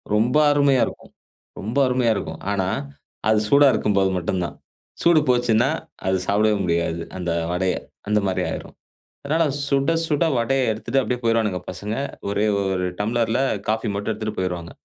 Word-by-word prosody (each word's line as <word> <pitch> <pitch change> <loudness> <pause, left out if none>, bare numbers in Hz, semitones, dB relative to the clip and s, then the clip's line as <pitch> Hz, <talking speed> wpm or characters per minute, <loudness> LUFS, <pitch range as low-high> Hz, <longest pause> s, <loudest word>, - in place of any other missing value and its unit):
ரொம்ப 120 +7 +2
அருமையா 140 -3 +3
இருக்கும். - - -10 0.5
ரொம்ப 110 +7 -4
அருமையா 125 -2 +2
இருக்கும். 80 -5 -5
ஆனா 95 -2 0 0.6
அது 110 -1 +4
சூடா 140 0 +6
இருக்கும்போது 100 -2 +2
மட்டும் 90 +1 -1
தான். 75 - -7 0.5
சூடு 170 -2 +5
போச்சுன்னா, 120 -2 +3 0.4
அது 95 0 +2
சாப்டவே 105 +2 +2
முடியாது 85 -1 0 0.2
அந்த 90 -2 -2 0.2
வடய. 90 +1 0 0.3
அந்த 105 0 +3
மாரி 95 - 0
ஆய்ரும். - - -7 0.5
அதனால 160 +4 +1 0.2
சுட, 140 +2 +2 0.2
சுட 150 0 +1
வடய 130 +3 +1
எடுத்துட்டு 115 +5 -1
அப்படியே 125 -1 -2
போயிருவானுங்க 115 -5 +1
பசங்க. 100 +4 -4 0.3
ஒரே 100 +1 +1 0.2
ஒரு 95 -2 -1
டம்ளர்ல 115 +2 0 0.3
காஃபி 110 +1 0
மட்டும் 105 +2 -2
எடுத்துட்டு 110 0 -5
போயிருவாங்க. 90 -2 -3
110 Hz, 150 wpm, -22 LUFS, 95-125 Hz, 0.6 s, சூடா